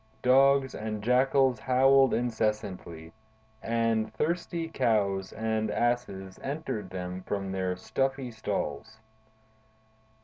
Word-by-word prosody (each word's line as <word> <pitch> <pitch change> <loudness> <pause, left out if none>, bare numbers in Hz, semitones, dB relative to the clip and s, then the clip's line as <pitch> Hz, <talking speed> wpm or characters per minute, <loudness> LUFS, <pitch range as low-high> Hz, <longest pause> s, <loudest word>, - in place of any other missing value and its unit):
Dogs 135 +1 +4
and 105 -1 -5
jackals 130 +1 +3
howled 135 0 +4
incessantly, 105 -8 -2 0.5
and 115 -1 0
thirsty 170 +4 -1
cows 105 -10 0
and 110 0 -1
asses 105 -5 -2
answered 135 -9 -4
them 90 0 -5
from 95 0 -3
their 95 -1 -1
stuffy 135 +5 -2
stalls. 110 -1 -4
110 Hz, 95 wpm, -28 LUFS, 100-130 Hz, 0.5 s, Dogs